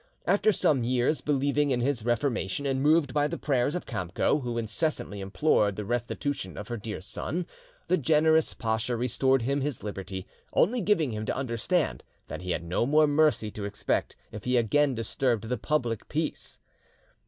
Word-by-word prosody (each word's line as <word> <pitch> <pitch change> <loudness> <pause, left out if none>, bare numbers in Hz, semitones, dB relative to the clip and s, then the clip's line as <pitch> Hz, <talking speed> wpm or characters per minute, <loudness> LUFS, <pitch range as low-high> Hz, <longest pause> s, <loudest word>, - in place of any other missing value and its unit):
After 205 +2 +4
some 150 - +2
years, 125 +5 +1
believing 145 0 +1
in 125 -2 +1
his 125 -2 0
reformation, 120 0 0
and 135 -1 0
moved 150 -2 +3
by 145 0 +2
the - - -4
prayers 140 +1 +1
of 180 - -3
Kamco, 95 - 0
who 120 -2 -3
incessantly 115 -1 -2
implored 100 0 +2
the 105 - -5
restitution 120 - -3
of 105 - -7
her 120 - -3
dear 105 -2 -6
son, 140 - -3 0.4
the 185 - +3
generous 160 +2 +3
pacha 110 +1 -1
restored 125 +2 +2
him 140 +3 0
his 140 -3 -3
liberty, 95 -2 -5 0.3
only 235 +7 +3
giving 175 - +2
him 110 0 -3
to - - -1
under 130 -3 -2
stand 115 - 0 0.3
that - - -5
he 90 - -6
had 85 - -1
no 90 +8 0
more 155 +2 +5
mercy 145 -7 +2
to 105 -1 -5
expect 100 0 -1 0.2
if 105 - -8
he 125 0 +2
again 135 +4 +2
disturbed 115 -1 -1
the 125 - 0
public 120 -7 -1
peace. 155 +1 -2
125 Hz, 175 wpm, -28 LUFS, 110-150 Hz, 0.4 s, more